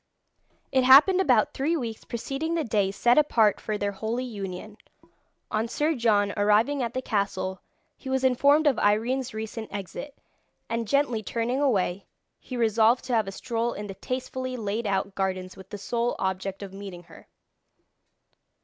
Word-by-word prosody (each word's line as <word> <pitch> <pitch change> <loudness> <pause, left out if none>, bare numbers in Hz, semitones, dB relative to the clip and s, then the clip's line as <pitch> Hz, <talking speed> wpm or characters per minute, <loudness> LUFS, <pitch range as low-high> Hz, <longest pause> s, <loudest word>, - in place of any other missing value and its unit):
It 260 -1 +3
happened 295 +9 +7
about 250 - +3
three 315 +5 0
weeks 230 -6 -5
preceding 275 +7 -3
the 325 - 0
day 210 -5 +1
set 240 +7 +3
apart 225 -8 +3
for 215 -1 -2
their 205 0 -1
holy 220 +5 -3
union, 205 -2 -7 0.7
on 220 +2 0
Sir 300 +7 0
John 210 -6 +2
arriving 215 +7 +2
at 235 0 -3
the 255 - -2
castle, 195 -4 -2 0.4
he 265 - -8
was 265 0 0
informed 280 +4 +4
of 285 -5 +3
Irene's 240 +5 +1
recent 220 0 -6
exit, 205 +8 -7 0.5
and 230 -1 -2
gently 265 -3 +1
turning 235 +5 -2
away, 200 -8 0 0.3
he 255 - -7
resolved 225 +1 +3
to 255 - -3
have 220 -3 +2
a - - -4
stroll 235 +3 -2
in 210 - -6
the 195 - -6
tastefully 255 +4 -4
laid 215 0 -2
out 195 0 -1
gardens 185 -1 -3
with 190 0 -13
the 205 - -6
sole 235 +4 -1
object 190 +1 -3
of 195 -1 -9
meeting 195 -3 -8
her. - - -16
225 Hz, 165 wpm, -26 LUFS, 200-255 Hz, 0.7 s, happened